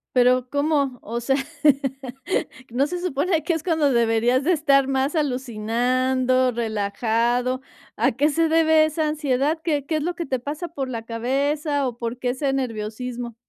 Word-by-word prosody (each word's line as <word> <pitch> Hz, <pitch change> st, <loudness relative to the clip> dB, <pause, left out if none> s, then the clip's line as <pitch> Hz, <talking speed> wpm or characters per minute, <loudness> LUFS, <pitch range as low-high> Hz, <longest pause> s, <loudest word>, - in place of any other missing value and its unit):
Pero, 250 Hz, 0 st, +3 dB
¿cómo? 285 Hz, -3 st, 0 dB
O 235 Hz, +3 st, -3 dB
sea, 270 Hz, +3 st, +1 dB, 1.4 s
¿no 270 Hz, +5 st, +1 dB
se 355 Hz, +1 st, -4 dB
supone, 330 Hz, -1 st, 0 dB
que 340 Hz, -, 0 dB
es 320 Hz, -, -2 dB
cuando 315 Hz, -5 st, +2 dB
deberías 235 Hz, +2 st, +2 dB
de 360 Hz, -, +3 dB
estar 275 Hz, -4 st, +3 dB
más 270 Hz, +3 st, 0 dB
alucinando, 255 Hz, -1 st, +1 dB
relajado? 235 Hz, +3 st, 0 dB, 0.3 s
¿A 265 Hz, -, +2 dB
qué 290 Hz, +5 st, +2 dB
se 325 Hz, +2 st, +1 dB
debe 315 Hz, -1 st, +5 dB
esa 310 Hz, 0 st, -1 dB
ansiedad? 300 Hz, 0 st, 0 dB
¿Qué 295 Hz, -4 st, 0 dB
qué 315 Hz, +2 st, -1 dB
es 305 Hz, -, -2 dB
lo 350 Hz, +2 st, -2 dB
que 340 Hz, -1 st, -4 dB
te 260 Hz, -3 st, -2 dB
pasa 300 Hz, +7 st, -5 dB
por 275 Hz, -5 st, -4 dB
la 230 Hz, -3 st, -4 dB
cabeza? 280 Hz, +4 st, -1 dB
¿O, 240 Hz, -, -5 dB
por 235 Hz, +1 st, -3 dB
qué 250 Hz, 0 st, -2 dB
ese 270 Hz, +2 st, -1 dB
nerviosismo? 240 Hz, -1 st, -4 dB
265 Hz, 165 wpm, -23 LUFS, 245-300 Hz, 1.4 s, debe